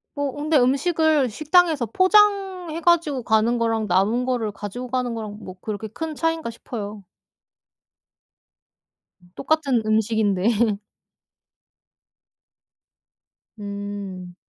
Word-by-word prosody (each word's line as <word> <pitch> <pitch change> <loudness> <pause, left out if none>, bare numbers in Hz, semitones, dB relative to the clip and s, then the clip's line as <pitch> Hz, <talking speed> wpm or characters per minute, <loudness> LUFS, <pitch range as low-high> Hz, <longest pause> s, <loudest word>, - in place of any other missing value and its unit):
뭐 285 -2 -1
근데 300 +1 +1
음식을 290 +1 +2
식당에서 310 - +2
포장해 375 - +2
가지고 315 -7 +2
가는 220 +2 +2
거랑 225 -2 0
남은 200 +7 +2
거를 245 -4 -1
가지고 205 +5 -7
가는 250 -2 -1
거랑 215 -2 -6
뭐 185 -2 -9
그렇게 215 +2 -5
큰 310 +9 -5
차이인가 325 -4 -1
싶어요. 210 -3 -7 2.3
똑같은 275 -5 +1
음식인데. 215 0 +1 2.8
음. 200 -3 -6
240 Hz, 210 characters per minute, -23 LUFS, 210-315 Hz, 2.8 s, 음식을